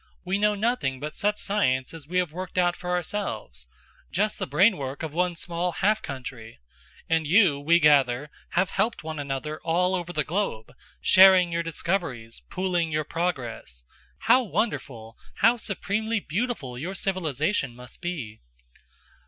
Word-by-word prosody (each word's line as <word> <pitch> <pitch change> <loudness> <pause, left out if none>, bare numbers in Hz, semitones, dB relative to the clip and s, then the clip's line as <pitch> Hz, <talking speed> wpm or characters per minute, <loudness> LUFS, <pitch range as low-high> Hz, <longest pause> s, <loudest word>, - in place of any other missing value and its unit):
"We 190 +2 0
know 210 0 +3
nothing 205 - 0
but 150 +2 -6
such 210 +1 0
science 130 -11 0
as 160 -3 -10
we 180 +3 -2
have 180 -4 +1
worked 185 +2 -7
out 175 -1 +3
for 180 - -7
ourselves, 155 - -3 0.4
just 210 +4 0
the - - -2
brain 185 - +4
work 140 +2 -5
of 155 -2 -4
one 180 +1 0
small 175 +1 -3
half 210 +3 +2
country; 120 - -8 0.5
and 160 -1 +1
you, 170 -4 +5
we 165 +4 +4
gather, 145 -2 +3 0.2
have 180 0 +2
helped 215 0 0
one 155 -1 -5
another 145 +2 -4
all 180 +3 +1
over 175 -2 -2
the 155 -3 0
globe, 160 - -3 0.3
sharing 185 -2 +7
your 170 0 0
discoveries, 165 - -3
pooling 180 -3 -1
your 155 0 0
progress. 125 - -4 0.4
How 250 +3 +5
wonderful, 130 - -3 0.2
how 230 +4 +4
supremely 220 +1 -2
beautiful 170 - -3
your 180 +7 -4
civilization 155 - -1
must 125 0 -13
be!" 150 -12 -5
170 Hz, 155 wpm, -26 LUFS, 140-190 Hz, 0.5 s, sharing